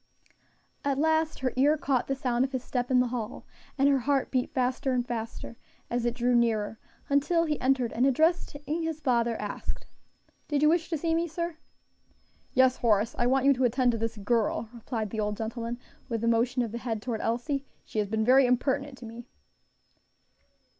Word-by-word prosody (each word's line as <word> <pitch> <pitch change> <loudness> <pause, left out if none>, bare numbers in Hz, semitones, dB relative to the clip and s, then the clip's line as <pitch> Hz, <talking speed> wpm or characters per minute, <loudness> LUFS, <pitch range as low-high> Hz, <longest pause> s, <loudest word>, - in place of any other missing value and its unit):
At 280 -1 0
last 315 0 +1
her 255 -1 0
ear 290 +4 +4
caught 270 -4 0
the 270 - 0
sound 250 -2 0
of 270 +1 -3
his 255 -1 -2
step 245 -1 -2
in 255 -1 +4
the 250 - 0
hall, 235 -2 -5 0.3
and 275 +1 +4
her 280 -1 +4
heart 275 +1 0
beat 255 -2 0
fast 255 +1 -1
and 250 -2 +1
faster 230 0 -5 0.3
as 240 0 0
it 240 0 0
drew 245 0 +1
nearer, 225 -3 +1 0.3
until 310 +4 +2
he 300 -2 -2
entered, 255 -2 +1
and 250 +4 +3
addressing 310 +1 +1 0.2
his 320 -1 -3
father, 235 -5 +1
asked, 210 -1 -5 0.6
"Did 295 -1 0
you 300 - +6
wish 335 0 +1
to 330 - -1
see 325 +2 0
me, 335 +1 +1
sir?" 335 0 -4 1.0
"Yes, 260 0 +4
Horace, 225 0 +2
I 240 - +3
want 265 +1 +2
you 280 - +7
to 260 0 -1
attend 250 +1 +3
to 230 - -3
this 225 0 -3
girl," 225 +1 0
replied 225 -2 -4
the 220 - -3
old 210 -1 -1
gentleman, 230 +2 -4 0.3
with 230 -1 -2
a - - +1
motion 240 +2 +2
of 230 - -4
the 235 - -4
head 225 -3 -3
toward 230 -4 -3
Elsie. 270 +4 -1 0.2
"She 215 - -3
has 210 - 0
been 220 +1 0
very 260 +2 +6
impertinent 265 +2 0
to 245 - -10
me." 230 +1 -9
250 Hz, 195 wpm, -28 LUFS, 230-280 Hz, 1.0 s, you